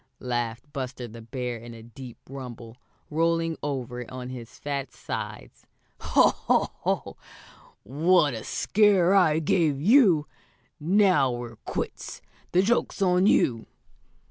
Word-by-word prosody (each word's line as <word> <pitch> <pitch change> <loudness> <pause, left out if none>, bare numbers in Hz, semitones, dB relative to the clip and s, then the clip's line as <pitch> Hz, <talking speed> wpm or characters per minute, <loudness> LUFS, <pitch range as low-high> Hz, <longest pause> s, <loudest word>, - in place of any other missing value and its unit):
laughed 120 -2 -2
Buster 130 -3 -5
the 115 +1 -11
Bear 125 +1 -4
in 115 +1 -10
a 115 - -12
deep 120 +1 -11
rumble, 120 -4 -9 0.4
rolling 165 +1 +1
over 125 -4 -4
on 125 -1 -7
his 125 -1 -9
fat 140 -3 -4
sides. - - -7 0.3
"Ho! - - +4
Ho! - - 0
Ho! - - -2 0.7
What 150 - +3
a 110 - -6
scare 195 -3 +3
I 170 -6 +4
gave 160 -2 +1
you! 185 - +5 0.5
Now 180 -5 +3
we're 120 -2 -6
quits. - - -5 0.3
The 180 +1 +3
joke's 235 +2 0
on 180 +1 +3
you!" 115 - +2
135 Hz, 125 wpm, -26 LUFS, 120-170 Hz, 0.7 s, you